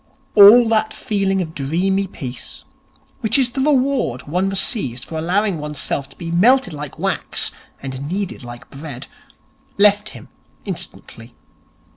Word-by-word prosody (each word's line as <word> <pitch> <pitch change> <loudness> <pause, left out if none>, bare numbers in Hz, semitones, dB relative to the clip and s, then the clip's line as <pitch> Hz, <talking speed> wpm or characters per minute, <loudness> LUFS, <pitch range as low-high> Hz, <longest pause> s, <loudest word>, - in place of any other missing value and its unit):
All 215 +4 +9
that 220 -1 +1
feeling 195 -2 0
of 160 -2 -9
dreamy 180 +8 0
peace, 125 -8 -7 0.6
which 220 - +1
is 255 -3 +2
the 265 - -2
reward 270 - +1
one 180 +6 -1
receives 155 - -1
for 160 - -8
allowing 185 +2 0
oneself 150 -2 -3
to - - -17
be 165 -1 -5
melted 245 +7 +4
like 150 -1 -7
wax - - -1 0.3
and 135 +1 -5
kneaded 190 -5 -3
like 120 0 -11
bread, 140 -3 -8 0.7
left 205 +1 +4
him - - -11 0.4
instantly. - - -7
190 Hz, 135 wpm, -19 LUFS, 145-215 Hz, 0.7 s, All